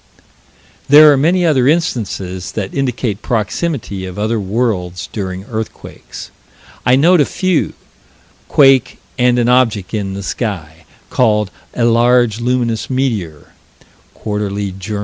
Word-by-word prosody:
There 150 +1 +8
are - - +4
many 170 +6 +2
other 135 -6 +2
instances 100 - -2
that 100 -3 -4
indicate 125 -6 -2
proximity 110 - -3
of 90 - -9
other 110 +2 -1
world's 95 -4 -2
during 95 -3 -5
earthquakes. 110 -1 -8 0.6
I 125 - +5
note 165 +5 +4
a - - +6
few 185 +3 -1 0.7
quake 135 -3 +4 0.2
and 125 0 +3
an 120 -1 +1
object 115 -6 +1
in 100 -3 -3
the 100 - -6
sky, 85 -8 -5 0.3
called 105 -5 +1 0.2
"a 120 - +1
large, 120 -1 +3
luminous 120 -2 -1
meteor" 110 - -3 0.6
(_Quar. 100 -2 -4
Jour. 105 +2 -4
115 Hz, 125 wpm, -15 LUFS, 100-130 Hz, 0.7 s, There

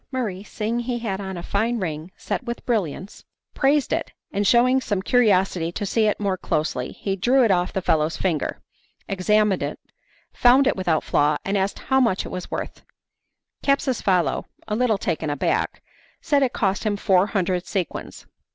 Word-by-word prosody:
Murray 220 -8 -3
seeing 220 +2 -3
he 240 0 -2
had 205 -4 -3
on 190 -2 -5
a 170 - -6
fine 225 +6 0
ring 160 -4 -4
set - - -3
with 240 -1 -6
brilliants, 200 - -2 0.3
praised 280 0 +2
it, - - -2 0.2
and 200 0 0
shewing 255 +2 +4
some 205 -5 -1
curiosity 190 -7 +2
to 205 - -3
see 215 +2 +2
it 210 - 0
more 195 -2 0
closely 150 -7 -2
he 195 -1 -3
drew 250 +7 +3
it 220 - +3
off 180 -1 +1
the 190 - -3
fellow's 155 +1 +1
finger, 165 -7 -1 0.5
examined 205 +1 +2
it, - - -3 0.6
found 255 +3 +5
it 275 - +2
without 175 -5 0
flaw, 150 +1 +2
and 195 - -1
asked 195 0 0
how 265 0 +1
much 230 -7 +1
it - - -6
was 180 - -6
worth. - - -5 0.8
Capsucefalo, 215 - +1 0.2
a 210 - -1
little 230 -2 +2
taken 165 -4 -2
aback, 145 -1 -1 0.4
said 290 -3 +1
it 260 -3 +2
cost 195 -2 0
him 210 -2 0
four 190 -1 +3
hundred 185 -4 -1
sequins. 185 -7 -4
200 Hz, 175 wpm, -23 LUFS, 180-240 Hz, 0.8 s, found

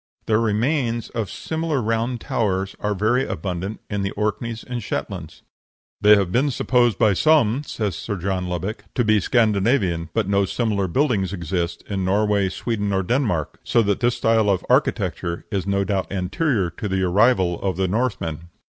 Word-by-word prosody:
The 110 0 +2
remains 115 +2 0
of 115 -4 -3
similar 160 -3 -2
round 115 +1 -1
towers 95 -3 -1
are 105 0 -1
very 115 +6 +2
abundant 95 - -4
in 100 -1 -2
the 100 - -1
Orkneys 105 +2 -2
and 125 -1 -5
Shetlands. - - -5 0.6
"They 105 0 +8
have 100 -3 0
been 135 +7 +2
supposed 120 -4 +2
by 110 -3 +4
some," 140 - +3
says 105 - -3
Sir 105 - -4
John 95 0 -2
Lubbock, 90 +5 -4
"to 125 - +2
be 110 -1 +4
Scandinavian, 100 - +1
but 110 -4 +1
no 100 0 +2
similar 100 -2 -1
buildings 100 - +1
exist 85 -1 -3
in 95 -2 -2
Norway, 100 0 +2
Sweden, 105 +1 -2
or 95 -1 +1
Denmark, 100 - -1
so 115 - +2
that 100 -1 0
this 120 0 +1
style 110 -2 +2
of 95 -3 +1
architecture 85 -1 0
is 100 -1 -2
no 100 0 +1
doubt 95 -2 -2
anterior 100 - 0
to 105 - -5
the 95 0 0
arrival 95 -2 +3
of 95 -3 -1
the 95 0 +1
Northmen." 90 -7 -2
105 Hz, 170 wpm, -22 LUFS, 95-115 Hz, 0.6 s, They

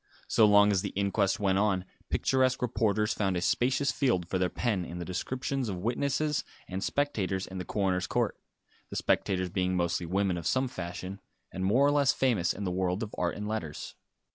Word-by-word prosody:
So 110 - +5
long 105 0 +6
as 95 -3 +2
the 100 - -3
inquest 100 0 +1
went 95 -2 +2
on, 95 -3 +1 0.2
picturesque 130 -1 +2
reporters 110 -3 +1
found 95 -3 0
a - - -1
spacious 130 +8 +2
field 115 - +1
for 95 - -1
their 90 0 +2
pen 105 -2 -1
in 85 0 -7
the 85 - -5
descriptions 130 +7 -2
of 95 - -3
witnesses 140 +5 0 0.2
and 95 +1 -4
spectators 100 -10 -1
in 95 0 -7
the 90 - -5
coroner's 95 -3 0
court; - - 0 0.5
the - - -7
spectators 95 -2 0
being 90 0 0
mostly 85 -1 0
women 95 0 0
of 85 - -4
some 130 0 +2
fashion, 95 -2 -6 0.3
and 95 +1 -3
more 120 +9 +4
or 145 - +4
less 145 -2 +3
famous 115 -10 +1
in 100 - -5
the 90 - -1
world 90 +2 -1
of 110 - -7
art 85 -1 -1
and 105 0 -5
letters. 85 -9 -4
100 Hz, 195 wpm, -29 LUFS, 90-120 Hz, 0.5 s, long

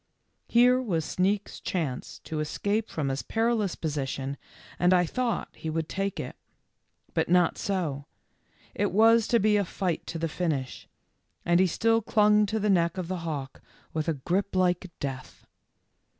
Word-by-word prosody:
Here 250 +2 +5
was 170 - -1
Sneak's 195 +2 -1
chance 155 -9 -3
to 155 -2 -4
escape 205 +8 -1
from 145 -4 -2
his 135 0 -2
perilous 225 -4 0
position 140 -3 -3 0.4
and 180 +1 +5
I 180 0 +4
thought 240 +6 -2
he 160 - -5
would 160 0 -2
take 195 0 -2
it. - - -5 0.8
But - - 0
not 175 -1 +4
so; 160 -8 -2 0.7
it - - 0
was 225 +3 +5
to 235 - +3
be 210 0 +3
a 205 - +2
fight 180 -1 -3
to 165 - -4
the 165 0 -1
finish, 155 -6 -3 0.6
and 175 0 +4
he 190 - +5
still 225 +6 +2
clung 210 -1 +4
to 220 +2 -1
the 210 - 0
neck 170 -3 +2
of 180 -2 -4
the 185 - -2
hawk 150 -5 -5 0.3
with 155 0 -2
a 165 - +1
grip 185 +9 -1
like 180 0 +1
death. 135 -2 -6
180 Hz, 165 wpm, -27 LUFS, 160-210 Hz, 0.8 s, Here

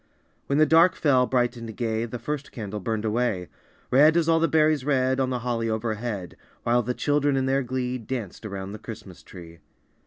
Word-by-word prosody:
When 140 - +1
the 155 - +6
dark 165 +4 +5
fell, 130 -4 +3
bright 125 -1 +1
and 115 -2 -8
gay 115 -1 -1
The 120 +1 -6
first 140 +4 -5
candle 105 -3 -5
burned 110 +1 -2
away, 110 -5 -1 0.4
Red 150 +5 +6
as 165 -2 +2
all 165 0 +4
the 165 - +3
berries 155 -2 +3
red 130 -2 +1
On 130 -1 +1
the 125 - -1
holly 115 -2 -1
overhead, 110 -3 -3 0.3
While 120 +1 +3
the 125 +2 -3
children 145 -1 +1
in 130 - +1
their 135 +1 +1
glee 125 0 -3
Danced 115 -4 -6
around 100 -2 -6
the 105 - -8
Christmas 105 -4 -10
tree. 85 -3 -12
125 Hz, 195 wpm, -25 LUFS, 110-140 Hz, 0.4 s, the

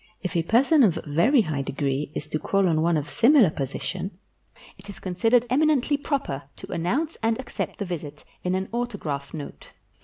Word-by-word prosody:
If 180 -3 -3
a 170 - +3
person 260 - +4
of 205 -10 +4
very 170 - +4
high 155 -8 -2
degree 140 +1 -2
is 150 - -3
to 155 - -1
call 195 +2 +1
on 160 -2 +2
one 170 0 +2
of 150 -1 -3
similar 240 - +5
position, 175 +7 -4 0.6
it 195 +1 -15
is 200 - -8
consid 185 +4 -1
ered 245 -1 +6
eminently 295 0 +3
proper 280 - -2
to - - -10
announce 255 - -1
and 225 +1 +1
accept 260 - -5
the 200 - -3
visit 150 -5 -6 0.2
in 180 0 0
an 190 +1 -2
autograph 195 -13 -3
note. 150 -3 -9
185 Hz, 185 wpm, -25 LUFS, 155-240 Hz, 0.6 s, ered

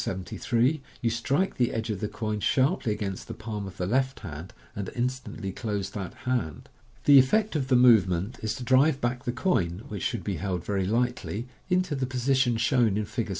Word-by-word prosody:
73, 120 - 0 0.2
you 115 - 0
strike 140 - 0
the 120 -2 +2
edge 115 0 -2
of 100 - -3
the 105 - -2
coin 105 0 -3
sharply 130 - +2
against 100 -3 -4
the - - -6
palm 110 -3 -5
of 95 - -10
the 90 - -1
left 130 +6 0
hand, 85 -1 -7 0.2
and 100 -2 -4
instantly 125 -5 -3
close 100 -2 -3
that 95 -4 -6
hand. 120 - -2 0.4
The 140 -1 +9
effect 210 +10 +2
of 135 -4 0
the 130 - +3
movement 110 -4 +4
is 110 -1 -2
to 130 - -6
drive 135 +3 +4
back 125 0 -2
the 120 - 0
coin 110 - 0
(which 100 -6 -5
should 115 -2 -2
be 100 -2 -2
held 90 0 -3
very 95 -2 0
lightly) 120 0 -1 0.2
into 180 -3 +1
the 130 -2 -1
position 130 -1 +1
shown 115 -3 +2
in 105 - -1
Fig. 110 +1 -3
115 Hz, 195 wpm, -27 LUFS, 100-130 Hz, 0.4 s, The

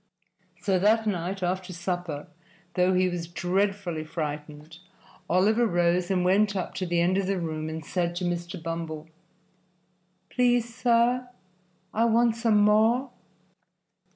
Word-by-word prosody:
So 190 -2 +2
that 220 +3 +3
night 190 -1 -2
after 185 +1 -2
supper, 175 -4 -4 0.5
though 180 +1 +2
he 185 0 +3
was 175 -2 -3
dreadfully 180 -1 -1
frightened, 150 0 -6 0.5
Oliver 215 +7 +3
rose 175 -1 +1
and 180 -2 +1
went 200 +2 +3
up 185 - -3
to 185 - -2
the 170 0 +1
end 180 +3 +2
of 195 - -2
the 195 0 0
room 160 -2 -3
and 160 -1 -6
said 175 0 -1
to 180 +1 -2
Mr. 175 +1 -3
Bumble, 165 -2 -5 1.2
"Please, 245 -2 +2
sir, 245 +1 +2 0.7
I 225 +2 +2
want 230 0 +3
some 230 -2 +2
more." 220 +5 +3
185 Hz, 135 wpm, -26 LUFS, 170-210 Hz, 1.2 s, that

